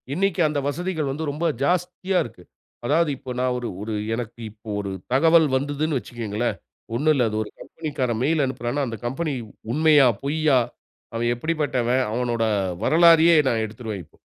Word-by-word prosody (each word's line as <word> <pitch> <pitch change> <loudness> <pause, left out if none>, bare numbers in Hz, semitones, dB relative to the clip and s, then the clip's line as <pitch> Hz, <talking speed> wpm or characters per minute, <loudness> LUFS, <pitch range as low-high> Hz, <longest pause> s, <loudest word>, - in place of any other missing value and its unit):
இன்னைக்கு 190 +2 +1
அந்த 150 -1 -1
வசதிகள் 160 0 -2
வந்து 150 +4 -4
ரொம்ப 155 +4 -3 0.2
ஜாஸ்தியா 180 +3 0
இருக்கு. 100 -6 -12 0.4
அதாவது 155 +5 +2
இப்ப 130 -1 -7
நான் 125 0 +1
ஒரு, 120 -1 -4
ஒரு 110 +1 -4 0.2
எனக்கு 120 0 -5
இப்ப 110 +1 -21
ஒரு 100 -1 -4 0.2
தகவல் 160 +3 +5
வந்ததுன்னு 145 +2 0
வச்சுக்கங்களேன், 115 -1 -3 0.4
ஒண்ணும் 155 +5 +3
இல்ல, 130 - +2
அது 110 - -3
ஒரு 105 - -10
கம்பெனிக்காரன் 130 -8 -3
மெயில் 155 +1 +2
அனுப்புறான்னா, 130 +2 -2
அந்த 115 -1 -5
கம்பெனி 145 +5 -2 0.4
உண்மையா? 150 -2 +5 0.2
பொய்யா? 145 -1 +3 0.5
அவன் 115 +1 -1
எப்படிப்பட்டவன்? 130 -4 0
அவனோட 120 -1 0 0.4
வரலாறையே 165 0 +6
நான் 115 -2 0
எடுத்துருவேன் 110 -3 -6
இப்போ. - - -28
140 Hz, 150 wpm, -23 LUFS, 120-160 Hz, 0.5 s, வரலாறையே